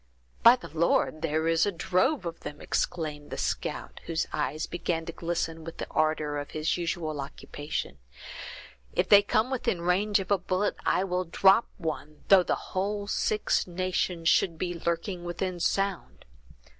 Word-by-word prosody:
"By 235 +2 +9
the 205 - -12
Lord, 160 -1 +2
there 160 0 0
is 165 +3 +3
a - - +1
drove 185 - +1
of 170 -1 -5
them!" 145 - -8
exclaimed 150 -3 -2
the - - -5
scout, - - -3
whose 165 -1 0
eyes 155 +1 -1
began 170 -1 -2
to 165 - -4
glisten 165 -1 -3
with 165 +1 -8
the - - -3
ardor 155 -2 +1
of 145 - -6
his 155 +1 -1
usual 165 -4 -2
occupation; 145 +1 -5 0.9
"if - - +1
they 205 -1 +8
come 215 +4 +1
within 240 -8 0
range 200 +4 +2
of 195 0 -5
a 200 - +4
bullet 185 +3 0
I 185 - +3
will 180 -1 -1
drop 195 +6 +4
one, 155 -3 -5
though 195 -2 +8
the - - 0 0.2
whole 200 +2 -1
Six 210 0 0
Nations 180 -1 -1
should 165 0 +3
be 175 +1 -2
lurking 170 +2 -2
within 175 +1 -3
sound! 195 +1 -1
175 Hz, 165 wpm, -28 LUFS, 160-190 Hz, 0.9 s, By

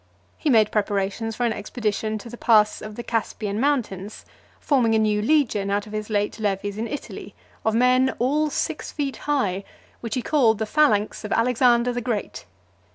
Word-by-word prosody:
He 305 - -2
made 220 -4 +4
preparations 205 +1 -1
for 245 - -1
an 230 - +1
expedition 215 0 -3
to 215 - -10
the - - -7
Pass 215 -3 +3
of 215 0 -8
the 240 - -6
Caspian 215 -3 -2
mountains; 220 -8 -2 0.3
forming 240 -6 +2
a - - +4
new 210 -1 +2
legion 225 -7 +1
out 205 +1 0
of 215 - -11
his 215 0 -4
late 205 +1 -1
levies 205 0 -2
in 230 - -2
Italy, 290 - -7 0.3
of 220 0 +1
men 255 +2 +3
all 295 +5 +1
six - - -3
feet 280 -3 -3
high, 200 -10 0 0.4
which 230 -2 -4
he 250 - -2
called 235 -8 +3
the 220 - -2
phalanx 215 -6 +2
of 210 - -6
Alexander 245 0 +3
the 245 - -2
Great. 230 -4 -4
225 Hz, 180 wpm, -23 LUFS, 210-250 Hz, 0.4 s, made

